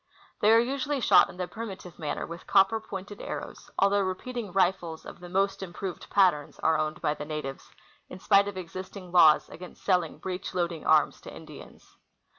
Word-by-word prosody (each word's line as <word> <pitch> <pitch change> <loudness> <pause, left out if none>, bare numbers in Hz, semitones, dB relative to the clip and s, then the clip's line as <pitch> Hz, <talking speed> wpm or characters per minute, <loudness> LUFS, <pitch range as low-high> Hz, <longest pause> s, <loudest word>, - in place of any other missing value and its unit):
They 210 - +4
are 225 - +7
usually 275 +4 0
shot - - +5
in - - -11
the 180 -1 -3
primitive 195 -6 -8
manner 150 -3 -3
with 170 +1 -10
copper 195 +3 +4
pointed 200 -1 -8
arrows, - - -7
although 200 +1 +3
repeating 205 +3 -4
rifles 175 -3 0
of - - -10
the 175 0 -10
most 195 +2 0
improved 185 0 -6
patterns 180 -7 +2
are 160 - +3
owned 155 0 -2
by 150 - +1
the 150 - -7
natives, 150 -3 -6 0.4
in - - -8
spite 200 +1 +4
of 200 -2 -5
existing 185 +1 -8
laws 160 -4 +6
against 180 +1 -11
selling 185 -2 +1
breech 185 0 -5
loading 170 -3 -2
arms 155 -2 +3
to - - -10
Indians. - - -13
185 Hz, 180 wpm, -28 LUFS, 170-200 Hz, 0.4 s, are